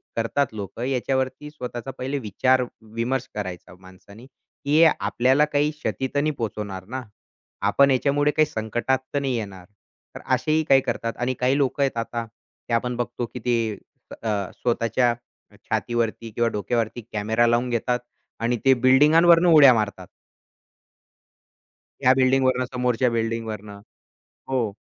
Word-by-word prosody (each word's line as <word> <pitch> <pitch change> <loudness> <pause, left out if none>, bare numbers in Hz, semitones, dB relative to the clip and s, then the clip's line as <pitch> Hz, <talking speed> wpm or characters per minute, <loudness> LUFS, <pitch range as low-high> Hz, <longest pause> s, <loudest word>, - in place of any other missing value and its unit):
करतात 115 +3 0
लोक. 100 0 -7
याच्यावरती 130 +2 -2
स्वतःचा 125 -3 -6
पहिले 135 +3 -3
विचारविमर्श 120 +1 -1
करायचा 95 -3 -6
माणसानी, 95 +5 -15
की 140 +2 -4
हे 165 - +7
आपल्याला 130 +5 +2
काही 150 0 0
क्षती 150 -3 -3
तर - - +3
नाही 155 - +1
पोहचवणार 100 -4 -5
ना? 130 +4 -5 0.7
आपण 140 0 +4
ह्याच्यामुळे 145 +2 +2
काही 155 +1 +3
संकटात 120 +2 -1 0.2
तर 140 - +1
नाही 135 -3 -1
येणार? 100 -5 -7 0.5
तर - - -6 0.2
असेही 155 +5 0
काही 135 -1 +6
करतात 115 -2 -3
आणि 125 +1 -1
काही 130 +2 +2
लोक 140 -1 0
आहेत 135 -3 0
आता, 115 0 -3
ते 115 +1 -12
आपण 125 +1 0
बघतो 120 0 -3
की 125 - -5
ते 115 -4 0 0.5
अ, 105 -4 -2
स्वतःच्या 120 0 +1 0.4
अ, - - -20
छातीवरती 115 -1 -1
किंवा 120 +2 0
डोक्यावरती 115 +3 -2
कॅमेरा 110 +3 +1
लावून 120 +2 +1
घेतात 120 +1 0 0.4
आणि 120 +1 +1
ते 135 - +7
बिल्डिंगांवरून 155 +7 +5
उड्या 150 -6 +8
मारतात. 105 -5 -2 2.0
या 130 -1 +6
बिल्डिंगवरन, 130 -1 +2
समोरच्या 125 0 +1
बिल्डिंगवरन. 115 -2 -3 0.8
हो 120 -6 -1
125 Hz, 135 wpm, -23 LUFS, 115-135 Hz, 2.0 s, उड्या